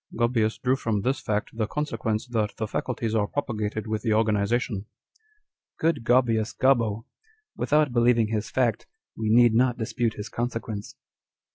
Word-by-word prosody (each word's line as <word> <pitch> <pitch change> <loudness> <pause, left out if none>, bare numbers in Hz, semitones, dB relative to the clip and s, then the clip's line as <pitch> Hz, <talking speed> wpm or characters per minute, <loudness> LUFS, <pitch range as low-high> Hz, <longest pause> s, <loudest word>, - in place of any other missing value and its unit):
Gaubius 115 -2 +1
drew 125 +1 +1
from 110 -6 -1
this 130 +6 0
fact 105 +1 -2
the 110 -2 -1
consequence, 115 -6 -2
that 110 -3 -1
the 110 - -2
faculties 115 -1 -2
are 105 -2 +1
propagated 110 -6 -3
with 110 -1 -2
the 110 -3 +1
organization." 110 +1 +1
â€" 95 - -7 0.9
Good 155 -6 0
Gaubius 115 -3 +2
Gobbo! 115 -5 +2 0.5
Without 150 -3 +2
believ 120 0 +4
ing 110 -2 +2
his 110 -1 -2
fact, 125 -3 0 0.3
we 110 -1 -2
need 120 +1 +6
not 125 +1 +3
dispute 115 0 -1
his 105 0 -6
consequence. 115 -3 -4
115 Hz, 155 wpm, -26 LUFS, 110-125 Hz, 0.9 s, need